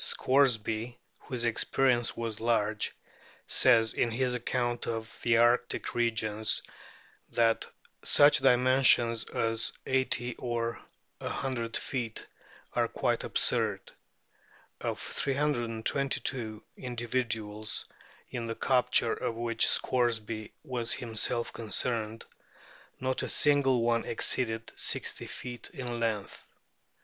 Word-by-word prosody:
Scoresby, 120 -3 +1 0.2
whose 125 -3 -3
experience 120 +1 +1
was 115 -2 -4
large, 110 -2 0 0.5
says, 115 -3 +4
in 120 - +1
his 125 +2 0
Account 120 0 -1
of 115 -1 -5
the 120 -1 +3
Arctic 120 +1 +2
Regions, 110 -2 0 0.7
that 115 -1 +2 0.4
such 145 0 +6
dimensions 125 -3 +4
as 115 0 0 0.3
So 125 -2 -1
or 115 -1 -2 0.4
100 120 -4 -2
feet 120 -5 -4 0.5
are - - +1
quite - - -1
absurd; - - 0 0.9
of - - -3
322 130 -3 -1
indi 120 -2 -5
viduals, 110 -3 -2 0.5
in 120 -1 -4
the 115 - -3
capture 125 -2 +2
of 115 - -3
which 115 -1 +3
Scoresby 115 -3 0
was 125 -5 -1
himself 115 0 -1
concerned, 115 0 -1 0.7
not 130 0 -1
a - - -3
single 135 -4 +3
one 115 0 +2
exceeded 115 -1 0
60 - - 0
feet 120 -1 -7
in 125 - -6
o 120 -1 -3
lenath. 110 -4 -2
120 Hz, 105 wpm, -30 LUFS, 115-125 Hz, 0.9 s, such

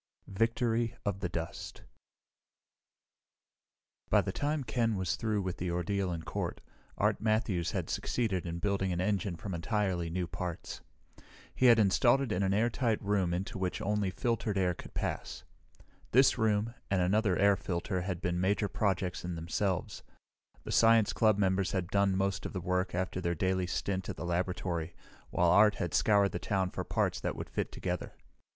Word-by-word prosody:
Victory 115 +2 0
of 100 -2 -1
the 90 -2 -2
Dust 85 -1 -6 2.3
By - - +5
the - - -3
time 145 +6 -1
Ken 115 -2 0
was 95 -3 -1
through 110 -3 -1
with 95 -1 -3
the 90 - -3
ordeal 90 +2 -1
in 85 -1 -4
court, - - -3 0.4
Art - - +1
Matthews 110 -6 +1
had - - -2
succeeded 100 -8 -1
in 85 0 -3
building 95 +1 0
an 85 - -1
engine 95 -1 0
from 95 +4 -6
entirely 90 -1 -1
new 90 +2 -1
parts. 85 0 -5 0.7
He 130 - +3
had 120 -1 +8
it 110 - +5
installed 120 +5 +3
in 90 - 0
an 95 -1 +2
airtight 115 +2 +1
room 100 -3 0
into 95 +4 -3
which 90 -1 -2
only 105 -1 0
filtered 110 0 -1
air 90 -2 +2
could - - -12
pass. - - -3 0.7
This 130 +2 +6
room, 110 0 +1 0.2
and 95 - +2
another 95 +1 +2
air 100 0 +5
filter, 90 +1 -2
had 90 -1 -3
been 90 -1 -1
major 100 +2 +1
projects 95 -3 -1
in 90 -1 -4
themselves. 90 +3 -2 0.6
The - - -6
science 115 -2 +5
club 110 -3 +3
members 95 -1 +1
had 90 -3 -1
done 100 -2 +2
most 100 0 -1
of - - -11
the 95 - -2
work 90 0 -1
after 95 0 -2
their 85 -1 0
daily 95 +2 0
stint 95 +1 -2
at - - -5
the 75 - -5
laboratory, 90 -1 -2 0.3
while 85 -1 +3
Art 105 +2 +6
had 85 - -3
scoured 100 -2 +4
the - - -3
town 95 -2 -1
for - - -4
parts - - 0
that - - -2
would - - -7
fit - - -2
together. 90 -1 -4
95 Hz, 175 wpm, -31 LUFS, 90-105 Hz, 2.3 s, had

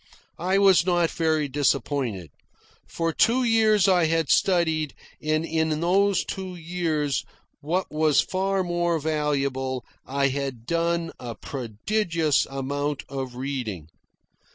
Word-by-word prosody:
I 185 +3 +1
was 195 -3 +5
not 175 -2 +2
very 155 -2 +1
disappointed. 130 - -1 0.6
For 165 -1 -2
two 250 +8 +3
years 220 -4 +4
I 180 -3 +4
had 165 -2 +1
studied, 160 -5 +2 0.3
and 155 +1 0
in 160 -1 0
those 190 +3 +2
two 185 -1 -5
years, 160 -4 -1 0.4
what 175 +6 -2
was 155 -1 +3
far 190 0 0
more 175 -1 0
valuable, 140 -4 -1 0.2
I 140 +1 +1
had 135 -4 -4
done 170 +2 0
a 120 -2 -6
prodigious 155 - -1
amount 140 +1 -3
of 130 -2 -5
reading. 125 - -4
155 Hz, 120 wpm, -25 LUFS, 140-175 Hz, 0.6 s, was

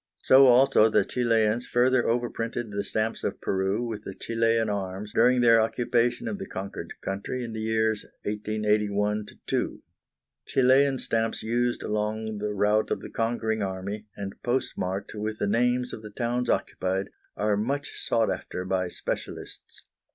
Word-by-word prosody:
So 135 +1 +7
also 125 -3 +6
the - - +3
Chilians 115 -1 +1
further 125 +1 +3
overprinted 120 -1 -2
the 100 0 -2
stamps 110 +2 -2
of - - -2
Peru 95 +4 0
with 110 -3 -5
the 95 - -7
Chilian 115 0 +1
arms 100 +1 -4
during 125 0 +4
their 115 -1 +6
occupation 120 - 0
of 205 -3 -3
the 195 - -6
conquered 100 +1 -6
country 100 +6 -3
in 115 -2 -6
the 110 - -4
years 110 -1 +1 0.2
1881 105 0 0 0.2
2. - - -2 0.6
Chilian 135 +1 +4
stamps 115 -2 -1
used 120 +2 0
along 105 0 -2
the 105 0 -2
route 105 +1 +2
of - - -1
the - - -9
conquering 115 -1 -1
army, 100 +2 -4
and 100 -1 -5
postmarked 100 -6 -2
with 110 0 -3
the - - -1
names 125 +4 +1
of - - -7
the 105 - -9
towns 120 +3 -2
occupied, 95 +1 -1 0.3
are 105 0 +2
much 140 +7 -2
sought 115 -1 +1
after 90 - -5
by 95 -1 0
specialists. - - -6
110 Hz, 150 wpm, -27 LUFS, 105-120 Hz, 0.6 s, So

